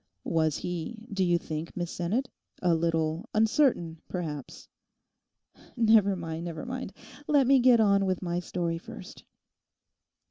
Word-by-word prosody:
'Was 160 -2 +1
he, 180 +6 -5
do 195 -1 +1
you 175 -1 +3
think, 160 0 -6
Miss 175 -1 -3
Sinnet, 210 +10 -1 0.3
a 180 -2 +2
little 165 0 0
uncertain, 215 - +2
perhaps?' 155 -7 -6 1.1
'Never 220 -4 +5
mind, 165 -2 -5
never 165 -2 -5
mind; 255 -4 -5 0.4
let 285 -3 +4
me 270 +1 +5
get 245 -1 +6
on 200 -2 +4
with 185 -2 0
my 175 0 -1
story 170 -1 -2
first. 180 +2 -11
180 Hz, 135 wpm, -28 LUFS, 165-220 Hz, 1.1 s, get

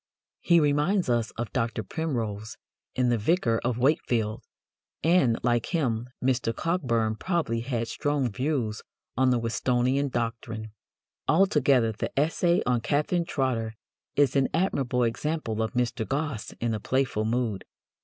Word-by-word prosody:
He 170 -1 +4
reminds 150 +4 +2
us 120 -2 +1
of 120 -1 -4
Dr. 115 -3 -1
Primrose 110 - -3 0.4
in 125 -1 +2
The 120 -2 +2
Vicar 115 - +2
of 120 -1 0
Wakefield, 120 -5 +1 0.6
and, 160 -9 +4
like 120 -1 +1
him, 125 -8 -1 0.2
Mr. 120 -3 +1
Cockburn 120 -11 0
probably 165 -10 -1
had 115 -1 -2
strong 145 -4 -1
views 125 -2 -1 0.3
on 130 +1 +3
the 125 - +3
Whistonian 125 +4 +1
doctrine." 115 -2 -4 0.6
Altogether 145 - +4
the 110 - -4
essay 170 +3 +2
on 125 -2 +1
Catherine 150 +7 0
Trotter 120 -7 -1 0.4
is 140 -2 +3
an 135 -1 +4
admirable 135 -9 +1
example 115 -1 -1
of 110 - -2
Mr. 125 -1 0
Gosse 140 -5 -2
in 115 -1 0
a 110 - -2
playful 130 -2 0
mood. 110 -3 -1
125 Hz, 135 wpm, -27 LUFS, 115-145 Hz, 0.6 s, He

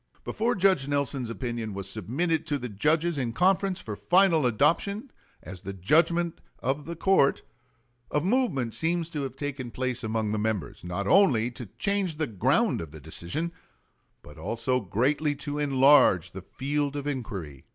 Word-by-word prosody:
Before 235 +3 -1
Judge 185 -8 +3
Nelson's 140 -3 -1
opinion 115 -3 -4
was 100 0 -4
submitted 150 - -1
to 145 -3 0
the 125 -2 -6
judges 155 - +1
in 120 -3 -2
conference 190 - +2
for 110 - -6
final 175 - +3
adoption 170 - +1 0.3
as 90 -1 -9
the 100 0 -6
judgment 165 - +2 0.2
of 140 +3 -2
the 170 - -5
court 165 -5 +3 0.7
a 150 - +1
movement 170 - 0
seems 165 0 0
to 150 -3 -4
have 135 -2 -5
taken 135 -3 -5
place 125 0 -3
among 110 -1 -1
the 110 - -1
members, 105 -10 -3
not 90 +3 -3
only 125 - +4
to 120 -1 -7
change 200 -5 0
the 155 - 0
ground 105 -8 +1
of 80 - -7
the 80 +1 -11
decision, 85 - -3 0.7
but 75 +2 -13
also 115 +8 -1
greatly 135 - 0
to 145 +1 -3
enlarge 135 - +5
the 95 - -8
field 140 +7 -2
of 145 -1 -4
inquiry. 100 - -5
140 Hz, 160 wpm, -27 LUFS, 110-165 Hz, 0.7 s, enlarge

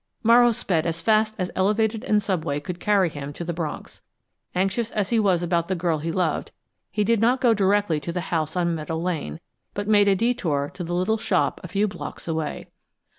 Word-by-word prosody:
Morrow 240 +1 +6
sped 175 -7 0
as 165 0 -2
fast 215 +4 +2
as 185 -3 -2
elevated 215 +3 +1
and 210 -3 +2
subway 155 -7 -1
could 175 +4 -6
carry 200 -2 +3
him 145 -3 -6
to 170 - -6
the 170 0 -3
Bronx. 160 -2 -6 0.5
Anxious 195 +5 0
as 205 -2 -2
he 230 - +3
was 185 -5 +2
about 170 -1 0
the 190 - -1
girl 170 -3 0
he 165 +2 -3
loved, 165 -3 -1 0.4
he 210 +3 0
did 230 +1 +2
not 245 +3 +3
go 240 -2 +4
directly 200 -5 +2
to 150 +4 -5
the 180 +1 -2
house 160 0 -1
on 170 -1 +1
Meadow 160 0 -3
Lane, 160 - -3 0.4
but 205 0 -3
made 205 -1 +5
a 195 - +5
detour 180 - 0
to 180 - -6
the 175 +1 -3
little 195 +5 +1
shop 185 -4 0
a - - -5
few 200 +4 +1
blocks 200 - -8
away. 160 -2 -3
185 Hz, 210 wpm, -24 LUFS, 165-210 Hz, 0.5 s, Morrow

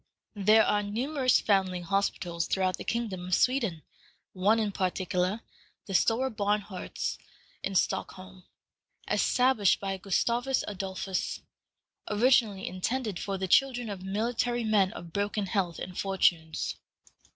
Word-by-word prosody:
There 215 +2 +6
are 210 - +2
numerous 255 +6 +1
foundling 190 -3 +1
hospitals 175 -2 -1
throughout 185 -1 0
the - - -7
kingdom 205 -7 -3
of 185 - +2
Sweden; 230 - +1 0.5
one 200 +4 +3
in 215 -2 0
particular, 185 +2 -1 0.4
the 195 - -6
Stora 230 +5 +2
Barnhorst 205 -2 -2 0.4
in 195 - -3
Stockholm, 185 +1 -2 0.6
established 250 -6 +3
by 195 -1 -3
Gustavus 235 +7 0
Adolphus, 190 -1 -3 0.7
originally 215 -3 +3
intended 210 +2 -2
for 195 -1 -3
the 190 0 -2
children 245 +1 +2
of 195 -2 -6
military 230 +5 -1
men 205 -3 +3
of 170 -5 -10
broken 205 0 -1
health 185 -3 -1
and 180 0 -7
fortunes. 175 -5 0
200 Hz, 120 wpm, -29 LUFS, 185-225 Hz, 0.7 s, There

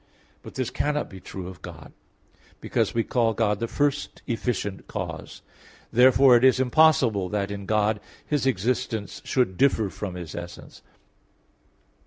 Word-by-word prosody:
But - - -12
this 130 -2 -2
cannot 150 +2 -1
be 95 - -9
true 95 0 -8
of 90 -1 -10
God; 80 -2 -11 0.7
because - - -1
we 115 - +2
call 115 -2 +1
God 105 -2 +1
the 115 - -2
first 145 +3 -1
efficient 110 -5 -3
cause. - - -6 0.5
Therefore 130 +1 +6
it 120 - +3
is 130 -1 +5
impossible 130 -8 +3
that 100 0 -2
in 100 -1 -6
God 105 0 +1 0.3
His 145 -3 0
existence 120 -1 -1
should 120 -9 0
differ 110 -7 +2
from 95 -4 -6
His 85 -4 -7
essence. 85 0 -9
115 Hz, 145 wpm, -25 LUFS, 100-130 Hz, 0.7 s, Therefore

